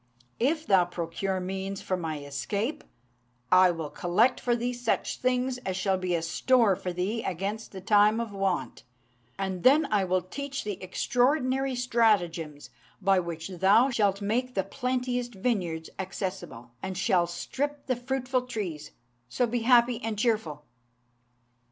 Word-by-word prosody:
If 310 Hz, +6 st, +1 dB
thou 190 Hz, -3 st, +4 dB
procure 175 Hz, +2 st, -3 dB
means 190 Hz, +1 st, -4 dB
for 190 Hz, -, -1 dB
my 160 Hz, -4 st, -4 dB
escape, 200 Hz, -, -3 dB, 0.7 s
I 185 Hz, 0 st, +7 dB
will 165 Hz, -4 st, -3 dB
collect 215 Hz, +9 st, +2 dB
for 240 Hz, -1 st, +1 dB
thee 240 Hz, +1 st, -2 dB
such 245 Hz, 0 st, -1 dB
things 255 Hz, 0 st, 0 dB
as 190 Hz, -6 st, -3 dB
shall 190 Hz, -1 st, +1 dB
be 180 Hz, -1 st, 0 dB
a 165 Hz, -, -1 dB
store 225 Hz, +4 st, +3 dB
for 180 Hz, -, -4 dB
thee 190 Hz, +6 st, -2 dB
against 200 Hz, +5 st, -4 dB
the 190 Hz, -, -8 dB
time 210 Hz, +2 st, +4 dB
of 230 Hz, -2 st, -3 dB
want, 195 Hz, -2 st, -2 dB, 0.6 s
and 190 Hz, -2 st, -3 dB
then 290 Hz, -, +5 dB
I 205 Hz, -2 st, +3 dB
will 185 Hz, -1 st, +1 dB
teach 275 Hz, +9 st, -5 dB
thee 205 Hz, -2 st, -4 dB
extraordinary 255 Hz, -, +1 dB
stratagems 185 Hz, -, +1 dB, 0.3 s
by 195 Hz, -1 st, +3 dB
which 170 Hz, -1 st, -5 dB
thou 195 Hz, +8 st, +4 dB
shalt 205 Hz, -4 st, +1 dB
make 250 Hz, +5 st, -1 dB
the 195 Hz, -, +1 dB
plenteous 250 Hz, +2 st, -2 dB
vineyards 190 Hz, -8 st, -2 dB
accessible, 185 Hz, -, -5 dB
and 190 Hz, -1 st, -4 dB
shalt 185 Hz, -3 st, +2 dB
strip 285 Hz, +11 st, -4 dB
the 255 Hz, -, 0 dB
fruitful 255 Hz, 0 st, -2 dB
trees: 180 Hz, -11 st, -5 dB, 0.4 s
so 245 Hz, -, +1 dB
be 240 Hz, +1 st, -1 dB
happy 240 Hz, 0 st, +4 dB
and 220 Hz, -1 st, -3 dB
cheerful." 205 Hz, -, -1 dB
200 Hz, 150 wpm, -28 LUFS, 180-245 Hz, 0.7 s, I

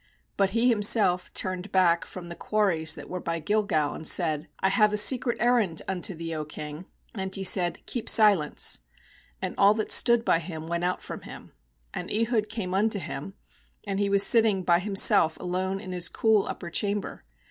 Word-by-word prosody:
19But 195 Hz, -1 st, +3 dB
he 230 Hz, +4 st, +2 dB
him 215 Hz, -3 st, 0 dB
self 200 Hz, -4 st, +3 dB
turned 185 Hz, +1 st, -4 dB
back 175 Hz, -3 st, +2 dB
from 180 Hz, -2 st, -10 dB
the 170 Hz, -, -7 dB
quarries 170 Hz, -8 st, 0 dB
that -, -, -10 dB
were 180 Hz, -, -5 dB
by 165 Hz, -1 st, -3 dB
Gilgal, 165 Hz, -4 st, 0 dB
and 160 Hz, -, -8 dB
said: 155 Hz, -3 st, 0 dB
'I 190 Hz, -, +2 dB
have 210 Hz, +2 st, +2 dB
a -, -, 0 dB
secret 240 Hz, +2 st, +3 dB
errand 235 Hz, -9 st, +1 dB
unto 190 Hz, 0 st, -2 dB
thee, 165 Hz, 0 st, -6 dB
O 155 Hz, -1 st, -4 dB
king.' 150 Hz, +3 st, -8 dB, 0.3 s
And 190 Hz, -2 st, -4 dB
he 195 Hz, -, -4 dB
said: 180 Hz, -2 st, +1 dB
'Keep 240 Hz, -, -4 dB
silence/ 200 Hz, -9 st, +3 dB, 0.6 s
And -, -, -3 dB
all 200 Hz, +1 st, +5 dB
that 215 Hz, -, -3 dB
stood 235 Hz, -1 st, +4 dB
by 165 Hz, -, +2 dB
him 160 Hz, -1 st, -8 dB
went 170 Hz, +1 st, -3 dB
out 180 Hz, +1 st, -2 dB
from -, -, -8 dB
him. -, -, -12 dB, 0.4 s
20And 210 Hz, -, -4 dB
Ehud 215 Hz, -3 st, -1 dB
came 210 Hz, -5 st, -5 dB
unto 210 Hz, +2 st, +1 dB
him; 195 Hz, 0 st, -7 dB, 0.5 s
and 195 Hz, -1 st, -3 dB
he 200 Hz, -1 st, 0 dB
was 200 Hz, 0 st, +5 dB
sitting 220 Hz, -5 st, +3 dB
by 170 Hz, -1 st, +3 dB
himself 190 Hz, -4 st, +3 dB
alone 185 Hz, +2 st, -3 dB
in 185 Hz, -, -9 dB
his 180 Hz, -1 st, -1 dB
cool 220 Hz, -3 st, +1 dB
upper 170 Hz, -2 st, -7 dB
chamber. 205 Hz, +2 st, -3 dB
190 Hz, 190 wpm, -26 LUFS, 170-210 Hz, 0.6 s, all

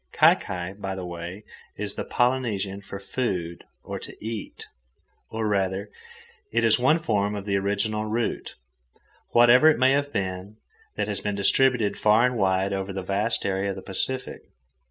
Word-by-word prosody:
Kai -, -, +7 dB
kai, 90 Hz, 0 st, -5 dB
by 95 Hz, -1 st, -5 dB
the 95 Hz, -1 st, -5 dB
way, 85 Hz, +3 st, -7 dB, 0.3 s
is 105 Hz, 0 st, -2 dB
the -, -, -4 dB
Polynesian 110 Hz, -6 st, 0 dB
for 100 Hz, 0 st, -8 dB
"food" 90 Hz, -6 st, -3 dB, 0.2 s
or -, -, -5 dB
"to -, -, -9 dB
eat," 110 Hz, -1 st, -6 dB, 0.6 s
or, 110 Hz, -1 st, -2 dB
rather, 100 Hz, 0 st, -1 dB, 0.6 s
it 115 Hz, +1 st, +1 dB
is 115 Hz, +1 st, +4 dB
one 135 Hz, +6 st, +4 dB
form 105 Hz, -9 st, 0 dB
of 100 Hz, -1 st, -5 dB
the 100 Hz, -1 st, 0 dB
original 105 Hz, +2 st, -1 dB
root, 115 Hz, +2 st, -2 dB, 0.7 s
whatever 120 Hz, +6 st, +6 dB
it 155 Hz, -, +3 dB
may 130 Hz, +1 st, +4 dB
have 145 Hz, +1 st, +1 dB
been, 95 Hz, +1 st, -4 dB, 0.4 s
that -, -, -1 dB
has 105 Hz, -2 st, -2 dB
been 105 Hz, -1 st, -2 dB
distributed 115 Hz, +2 st, +3 dB
far 110 Hz, +3 st, +5 dB
and 125 Hz, 0 st, 0 dB
wide 95 Hz, -2 st, +1 dB
over 95 Hz, 0 st, -3 dB
the 95 Hz, -1 st, -4 dB
vast 100 Hz, +5 st, -1 dB
area 95 Hz, 0 st, 0 dB
of 95 Hz, -, -3 dB
the -, -, -9 dB
Pacific. 125 Hz, +7 st, -2 dB
105 Hz, 170 wpm, -25 LUFS, 95-115 Hz, 0.7 s, Kai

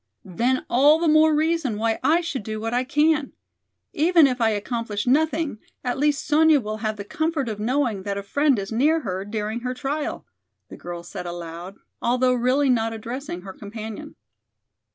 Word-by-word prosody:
"Then 240 Hz, +8 st, 0 dB
all 285 Hz, +6 st, +5 dB
the 335 Hz, 0 st, 0 dB
more 310 Hz, +1 st, +5 dB
reason 310 Hz, -7 st, 0 dB
why 225 Hz, +1 st, 0 dB
I 320 Hz, +6 st, +4 dB
should 310 Hz, -7 st, -4 dB
do 215 Hz, +1 st, -5 dB
what 225 Hz, +2 st, -3 dB
I 250 Hz, +1 st, +1 dB
can. 295 Hz, +2 st, +1 dB, 0.6 s
Even 330 Hz, +1 st, +5 dB
if 250 Hz, -2 st, 0 dB
I 225 Hz, -, +4 dB
accomplish 210 Hz, 0 st, -3 dB
nothing, 305 Hz, -1 st, +1 dB, 0.2 s
at 250 Hz, 0 st, -2 dB
least 290 Hz, -1 st, +1 dB
Sonya 310 Hz, 0 st, +5 dB
will 215 Hz, -2 st, -4 dB
have 215 Hz, 0 st, -2 dB
the 200 Hz, -, -5 dB
comfort 315 Hz, +5 st, -2 dB
of 215 Hz, -2 st, -4 dB
knowing 240 Hz, -2 st, 0 dB
that 200 Hz, 0 st, -3 dB
a 200 Hz, -, -4 dB
friend 285 Hz, +5 st, +2 dB
is 195 Hz, +1 st, -4 dB
near 300 Hz, +8 st, +2 dB
her 190 Hz, -6 st, -3 dB
during 215 Hz, +2 st, -3 dB
her 250 Hz, +1 st, -4 dB
trial," 290 Hz, +3 st, -3 dB, 0.4 s
the -, -, -9 dB
girl 175 Hz, -1 st, -7 dB
said 175 Hz, +1 st, -7 dB
aloud, 175 Hz, +2 st, -7 dB, 0.3 s
although 250 Hz, +1 st, +2 dB
really 255 Hz, +4 st, +2 dB
not 225 Hz, -2 st, +1 dB
addressing 230 Hz, -3 st, -6 dB
her 190 Hz, 0 st, -9 dB
companion. 220 Hz, +8 st, -8 dB
245 Hz, 180 wpm, -23 LUFS, 215-295 Hz, 0.6 s, all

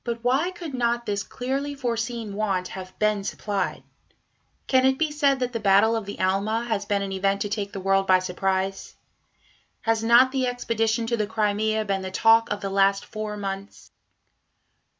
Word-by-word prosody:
But 235 Hz, -1 st, -4 dB
why 270 Hz, +8 st, +2 dB
could 350 Hz, -5 st, -8 dB
not 240 Hz, -1 st, 0 dB
this 205 Hz, -2 st, -1 dB
clearly 270 Hz, +7 st, -3 dB
foreseen 230 Hz, -4 st, -3 dB
want 195 Hz, -3 st, -1 dB
have 185 Hz, -1 st, -9 dB
been 215 Hz, -1 st, +1 dB
supplied? 200 Hz, -1 st, -3 dB, 0.8 s
Can 260 Hz, -1 st, +3 dB
it 265 Hz, 0 st, +3 dB
be 315 Hz, 0 st, 0 dB
said 285 Hz, -2 st, +2 dB
that 250 Hz, 0 st, -1 dB
the 230 Hz, -, -2 dB
Battle 205 Hz, +2 st, +4 dB
of 220 Hz, -3 st, -3 dB
the 200 Hz, -, -7 dB
Alma 200 Hz, +5 st, 0 dB
has 215 Hz, -4 st, -2 dB
been 200 Hz, -1 st, 0 dB
an 195 Hz, -, -4 dB
event 195 Hz, +1 st, 0 dB
to 205 Hz, -, -1 dB
take 205 Hz, -1 st, -3 dB
the 195 Hz, -, -6 dB
world 195 Hz, 0 st, +1 dB
by 185 Hz, -, +6 dB
surprise? 190 Hz, +1 st, -2 dB, 0.9 s
Has 225 Hz, -1 st, 0 dB
not 240 Hz, +3 st, +6 dB
the 260 Hz, -1 st, 0 dB
expedition 230 Hz, -2 st, 0 dB
to 235 Hz, +1 st, -1 dB
the 210 Hz, -1 st, -1 dB
Crimea 215 Hz, 0 st, 0 dB
been 195 Hz, -1 st, -1 dB
the 190 Hz, -, -5 dB
talk 225 Hz, +4 st, +4 dB
of 205 Hz, 0 st, -3 dB
the 195 Hz, -, -3 dB
last 195 Hz, 0 st, +2 dB
four 215 Hz, -1 st, -5 dB
months? 195 Hz, 0 st, -6 dB
215 Hz, 185 wpm, -25 LUFS, 195-235 Hz, 0.9 s, by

